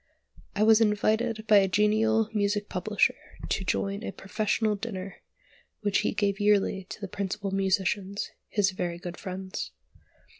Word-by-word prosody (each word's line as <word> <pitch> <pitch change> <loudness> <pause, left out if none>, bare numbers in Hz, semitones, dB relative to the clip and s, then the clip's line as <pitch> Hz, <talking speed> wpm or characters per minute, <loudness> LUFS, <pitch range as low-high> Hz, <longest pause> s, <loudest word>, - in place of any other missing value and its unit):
I 210 - +2
was 220 +1 +6
invited 220 +1 +1
by 215 -1 +6
a 195 -1 +5
genial 215 +3 +3
music 205 0 0
publisher - - +1 0.4
to 195 - 0
join 200 +2 -1
a - - -3
"professional 215 +1 -1
dinner" 195 -3 -6 0.6
which 205 -2 +2
he - - 0
gave 200 -1 0
yearly 205 -2 +2
to - - -7
the 200 - -5
principal 200 +1 -3
musicians, 195 +1 0 0.2
his 200 -3 +2
very 175 -2 -3
good 175 0 -7
friends. 185 - -5
205 Hz, 145 wpm, -28 LUFS, 190-215 Hz, 0.6 s, was